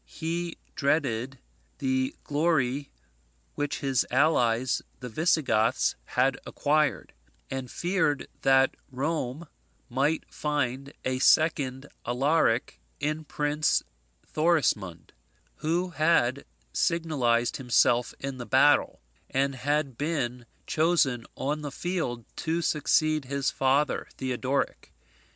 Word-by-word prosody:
He 165 Hz, -, -4 dB, 0.2 s
dreaded 140 Hz, -3 st, 0 dB, 0.4 s
the 130 Hz, -1 st, 0 dB
glory 145 Hz, -3 st, 0 dB, 0.6 s
which 145 Hz, -1 st, -3 dB
his 135 Hz, -3 st, +2 dB
allies 125 Hz, -3 st, +2 dB, 0.2 s
the 125 Hz, -, -6 dB
Visigoths 130 Hz, -6 st, +2 dB
had 130 Hz, +2 st, +1 dB
acquired; 150 Hz, 0 st, 0 dB, 0.4 s
and 130 Hz, -1 st, -4 dB
feared 175 Hz, -4 st, 0 dB
that 135 Hz, 0 st, +4 dB, 0.2 s
Rome 140 Hz, +2 st, -3 dB, 0.4 s
might 140 Hz, +6 st, +1 dB
find 140 Hz, -2 st, -2 dB
a 130 Hz, 0 st, 0 dB
second 140 Hz, -3 st, +3 dB, 0.2 s
Alaric 125 Hz, -1 st, +1 dB, 0.2 s
in 155 Hz, +2 st, -2 dB
Prince 150 Hz, +1 st, +1 dB, 0.4 s
Thorismund, 125 Hz, -, 0 dB, 0.5 s
who 175 Hz, +4 st, -1 dB
had 155 Hz, -5 st, +2 dB, 0.3 s
signalized 130 Hz, -9 st, +1 dB
himself 125 Hz, -1 st, +2 dB
in 135 Hz, -1 st, -5 dB
the 120 Hz, -, -6 dB
battle, -, -, +4 dB, 0.3 s
and 135 Hz, +1 st, +1 dB
had 140 Hz, 0 st, -1 dB
been 125 Hz, -6 st, -2 dB, 0.2 s
chosen 155 Hz, -7 st, +2 dB
on 150 Hz, +3 st, -2 dB
the 145 Hz, -1 st, -5 dB
field 135 Hz, -9 st, -3 dB
to 165 Hz, +1 st, -1 dB
succeed 155 Hz, -1 st, +2 dB
his 140 Hz, +1 st, -1 dB
father 135 Hz, +1 st, +1 dB
Theodoric. 130 Hz, +1 st, -2 dB
140 Hz, 100 wpm, -27 LUFS, 125-155 Hz, 0.6 s, that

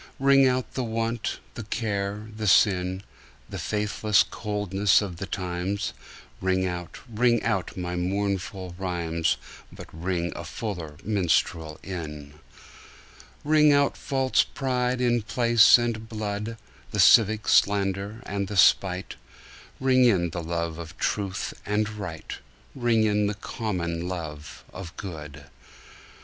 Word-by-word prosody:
Ring 135 Hz, 0 st, +5 dB
out 130 Hz, -1 st, -1 dB
the 130 Hz, -, -2 dB
want, 115 Hz, 0 st, -2 dB, 0.2 s
the -, -, -6 dB
care 105 Hz, -2 st, -3 dB
the 110 Hz, -1 st, -3 dB
sin, 95 Hz, -1 st, +3 dB, 0.5 s
The -, -, -5 dB
faithless 105 Hz, 0 st, +2 dB
coldness 105 Hz, -2 st, +1 dB
of 95 Hz, -5 st, -5 dB
the 100 Hz, -, -5 dB
times; 90 Hz, +2 st, -3 dB, 0.5 s
Ring 95 Hz, 0 st, +1 dB
out, 90 Hz, -2 st, -5 dB
ring 120 Hz, 0 st, +2 dB
out 95 Hz, -6 st, -1 dB
my 90 Hz, -1 st, -3 dB
mournful 95 Hz, 0 st, -2 dB
rhymes, 85 Hz, -3 st, -1 dB, 0.3 s
But -, -, -10 dB
ring 85 Hz, 0 st, -2 dB
the 85 Hz, -, -7 dB
fuller 85 Hz, -4 st, -5 dB
minstrel 85 Hz, -5 st, 0 dB
in. 75 Hz, -6 st, -7 dB, 1.1 s
Ring 150 Hz, 0 st, +5 dB
out 140 Hz, -1 st, +3 dB
false 135 Hz, -1 st, +1 dB
pride 125 Hz, -1 st, -1 dB
in 120 Hz, -1 st, +2 dB
place 115 Hz, +1 st, +6 dB
and 115 Hz, -2 st, -3 dB
blood, 105 Hz, +1 st, -4 dB, 0.3 s
The 105 Hz, -, -4 dB
civic 105 Hz, +3 st, +6 dB
slander 100 Hz, +2 st, +2 dB
and 100 Hz, -1 st, -2 dB
the 100 Hz, -, -4 dB
spite; 95 Hz, 0 st, +3 dB, 0.6 s
Ring 130 Hz, -1 st, +4 dB
in 90 Hz, -8 st, +3 dB
the 85 Hz, -, -4 dB
love 85 Hz, 0 st, -3 dB
of 85 Hz, +1 st, -9 dB
truth 100 Hz, -2 st, -2 dB
and 105 Hz, +1 st, 0 dB
right, 100 Hz, -7 st, -7 dB, 0.3 s
Ring 120 Hz, -4 st, +2 dB
in 105 Hz, -1 st, +2 dB
the 105 Hz, -, -2 dB
common 90 Hz, -6 st, -3 dB
love 80 Hz, -5 st, -6 dB
of 90 Hz, -2 st, -9 dB
good. 75 Hz, -6 st, -8 dB
100 Hz, 130 wpm, -26 LUFS, 90-110 Hz, 1.1 s, place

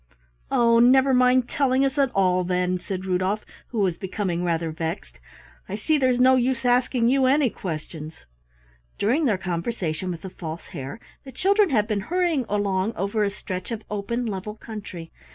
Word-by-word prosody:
"Oh, 235 Hz, -1 st, +4 dB
never 265 Hz, +3 st, +5 dB
mind 250 Hz, 0 st, +4 dB
telling 270 Hz, -1 st, +2 dB
us 270 Hz, 0 st, -1 dB
at 275 Hz, -2 st, +3 dB
all, 185 Hz, -2 st, +3 dB
then," 180 Hz, 0 st, 0 dB
said 185 Hz, +1 st, -5 dB
Rudolf, 190 Hz, +3 st, 0 dB, 0.2 s
who 225 Hz, -4 st, -2 dB
was 185 Hz, -4 st, 0 dB
becoming 185 Hz, -2 st, -2 dB
rather 165 Hz, -2 st, -1 dB
vexed, 160 Hz, -, -5 dB, 0.5 s
"I 200 Hz, -, -3 dB
see 300 Hz, +8 st, +1 dB
there's 255 Hz, -2 st, +2 dB
no 260 Hz, +1 st, +6 dB
use 250 Hz, -1 st, 0 dB
asking 245 Hz, -1 st, +3 dB
you 265 Hz, 0 st, +3 dB
any 270 Hz, -2 st, +3 dB
questions." 155 Hz, -, -7 dB, 0.7 s
During 260 Hz, +10 st, +1 dB
their 215 Hz, -7 st, +2 dB
conversation 180 Hz, -1 st, -3 dB
with 170 Hz, -2 st, -5 dB
the 190 Hz, -, -7 dB
False 165 Hz, -2 st, -7 dB
Hare, 140 Hz, +6 st, -7 dB, 0.2 s
the 265 Hz, -, -10 dB
children 395 Hz, -, +3 dB
had 215 Hz, -6 st, +2 dB
been 210 Hz, -3 st, -1 dB
hurrying 335 Hz, -, 0 dB
along 200 Hz, +1 st, 0 dB
over 200 Hz, +3 st, 0 dB
a 200 Hz, -, +1 dB
stretch 185 Hz, -2 st, -6 dB
of 225 Hz, -2 st, -5 dB
open 220 Hz, +4 st, -2 dB
level 210 Hz, 0 st, -4 dB
country. 205 Hz, -7 st, -8 dB
210 Hz, 170 wpm, -24 LUFS, 180-255 Hz, 0.7 s, no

